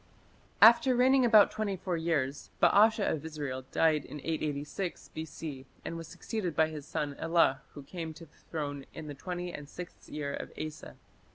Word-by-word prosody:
After 235 +3 +8
reigning 260 +1 +5
about 220 -3 +7
twenty 210 -3 -2
four 180 -1 -2
years, 145 -5 -1
Baasha 215 0 +5
of 155 - -1
Israel 145 -5 -5
died 155 -3 +3
in 150 - -8
886 155 +3 -3
B.C. 155 -4 -6 0.2
and 165 - -4
was 165 -1 -6
succeeded 185 -3 -4
by 160 0 +4
his 150 -2 -8
son 145 -1 -2
Elah 165 -5 +3
who 145 - -8
came 165 +2 -6
to 165 - -11
the 150 - -26
throne 145 -4 -4
"in 160 - -7
the 150 - -6
twenty 175 +4 -5
and 145 -1 -8
sixth 180 +2 -10
year 145 -2 -3
of - - -6
Asa". 155 -1 -6
160 Hz, 175 wpm, -31 LUFS, 145-180 Hz, 0.2 s, After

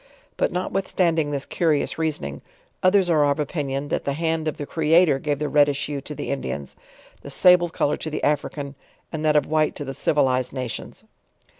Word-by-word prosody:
But - - 0
notwithstanding 180 -3 0
this 140 -1 -2
curious 160 -2 0
reasoning, 70 - -2 0.4
others 185 0 +4
are 160 -4 +3
of 140 - 0
opinion, 145 -2 -2
that - - -1
the 140 - -1
hand 160 +1 -1
of 155 - -2
tho 145 - -4
Creator 160 -1 +3
gave 145 0 -1
the 150 +1 -2
reddish 145 -1 +3
hue 145 -2 -4
to 150 +2 -8
the - - -4
Indians, 70 - -4 0.5
the - - -9
sable 180 -1 +5
color 150 -2 0
to 160 - -5
the 155 - -4
African, 145 -1 -1 0.4
and 155 -1 -4
that 155 -1 +3
of 150 - +4
white 155 0 +1
to 145 - -6
the 135 - -5
civilized 130 -3 +1
na 130 -2 -3
tions. 120 - -7
150 Hz, 190 wpm, -23 LUFS, 140-160 Hz, 0.5 s, sable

